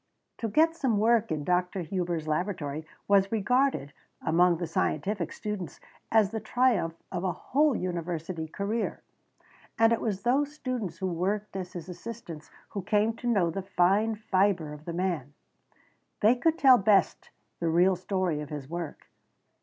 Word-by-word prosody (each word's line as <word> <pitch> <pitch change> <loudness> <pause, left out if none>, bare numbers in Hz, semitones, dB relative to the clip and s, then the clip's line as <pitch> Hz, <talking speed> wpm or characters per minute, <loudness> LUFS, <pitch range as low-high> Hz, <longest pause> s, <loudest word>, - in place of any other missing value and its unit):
To 230 - -1
get 320 +9 +3
some 255 -9 +1
work 225 +1 +3
in 155 -2 -1
Dr. 180 +3 0
Hubers' 170 -2 -2
laboratory 155 -2 -2 0.2
was 195 -1 +4
regarded, 240 - +1 0.3
among 170 +2 +3
the 175 - -3
scientific 170 +3 -1
students, 210 -4 -5 0.3
as 215 -3 +4
the 225 - -2
triumph 215 -6 +1 0.2
of 175 - -3
a 185 - +1
whole 290 - +1
university 170 -2 -3
career. 200 +7 -3 0.7
And 225 0 +5
it 230 - -1
was 200 -4 -2
those 280 +5 +1
students 240 - -4
who 190 - -3
worked 195 +4 -2
as 185 -2 -5
his 175 -2 -7
assistants 180 -4 -8 0.2
who 200 - -4
came 210 +3 +2
to 245 - -5
know 195 -8 +2
the 195 - -3
fine 195 +4 +2
fibre 190 -6 +1
of 150 +1 -12
the 170 - -4
man. 170 -6 -2 0.9
They 215 +3 +6
could 320 +6 +1
tell 260 -5 +7
best 200 0 +2 0.3
the 170 - 0
real 180 +3 +4
story 180 -4 -1
of 150 - -7
his 145 -3 -6
work. 170 -1 -6
190 Hz, 160 wpm, -28 LUFS, 170-220 Hz, 0.9 s, tell